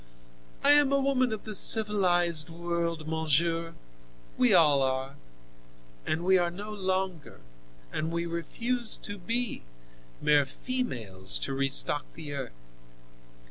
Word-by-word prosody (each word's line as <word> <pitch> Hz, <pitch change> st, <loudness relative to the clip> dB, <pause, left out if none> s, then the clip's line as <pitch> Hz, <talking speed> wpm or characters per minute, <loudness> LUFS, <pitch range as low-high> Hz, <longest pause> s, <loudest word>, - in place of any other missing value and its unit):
I 285 Hz, -, +7 dB
am 290 Hz, -2 st, +4 dB
a 275 Hz, -, +2 dB
woman 265 Hz, -3 st, 0 dB
of 220 Hz, -, -6 dB
the 215 Hz, -, -8 dB
civilized 180 Hz, -7 st, +4 dB
world, 170 Hz, -1 st, -4 dB
monsieur—we 160 Hz, -, -3 dB
all 150 Hz, -7 st, +4 dB
are—and -, -, -7 dB
we 190 Hz, 0 st, +3 dB
are 175 Hz, -1 st, 0 dB
no 205 Hz, +5 st, -9 dB
longer, 190 Hz, -4 st, -4 dB, 0.5 s
and 160 Hz, -, -3 dB
we 170 Hz, 0 st, -3 dB
refuse 230 Hz, +8 st, -1 dB
to 205 Hz, -1 st, -9 dB
be, 230 Hz, +5 st, -3 dB, 0.6 s
mere 150 Hz, -2 st, +2 dB
females 115 Hz, -, 0 dB
to -, -, -5 dB
restock 135 Hz, +2 st, +2 dB
the 155 Hz, -3 st, -8 dB
earth." 135 Hz, -4 st, -6 dB
170 Hz, 115 wpm, -27 LUFS, 135-205 Hz, 0.6 s, I